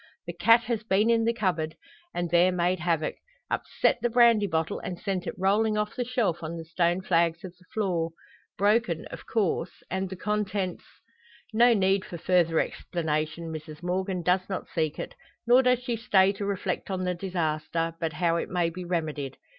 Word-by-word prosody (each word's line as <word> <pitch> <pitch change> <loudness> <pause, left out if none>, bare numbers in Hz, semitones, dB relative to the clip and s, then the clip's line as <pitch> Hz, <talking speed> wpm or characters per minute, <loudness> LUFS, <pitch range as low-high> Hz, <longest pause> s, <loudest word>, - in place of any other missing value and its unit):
The 170 - -5
cat 230 +7 +5
has 235 -2 -2
been 215 +1 +2
in 225 -1 +3
the 230 - +3
cupboard, 175 -8 -1 0.4
and 175 -2 -3
there 175 +1 +5
made 180 0 +1
havoc 165 -2 0 0.3
upset - - +1
the 240 - +1
brandy 230 -3 +5
bottle, 160 -2 -1
and 180 - -5
sent 190 -3 -3
it - - -3
rolling 210 +3 +2
off 210 0 -2
the 250 - -1
shelf 235 -8 0
on 165 +1 -5
the 165 - -7
stone 170 +2 +1
flags 170 -2 +1
of 185 -1 -8
the 180 - -24
floor! 180 -6 0 0.5
Broken, 205 -5 +2
of - - -9
course, 195 -5 -1
and 190 0 -1
the 190 - -6
contents 200 -2 -2 0.7
No 235 +1 +6
need 195 -1 +2
for 175 - -7
further 170 -1 +2
explanation, 160 0 -2
Mrs 155 +1 -8
Morgan 185 0 -1
does 185 +2 +1
not 190 - -4
seek 155 -2 0
it. - - -5 0.3
Nor 245 +2 +6
does 250 -1 +2
she 245 -2 -1
stay 195 -4 +4
to 200 0 -4
reflect 195 -2 -2
on 185 -1 -2
the 180 0 0
disaster, 165 -2 -2
but 165 -1 -2
how 165 +2 +1
it - - -3
may 175 -2 0
be 180 +2 -7
remedied. 155 -6 -3
180 Hz, 185 wpm, -27 LUFS, 165-210 Hz, 0.7 s, No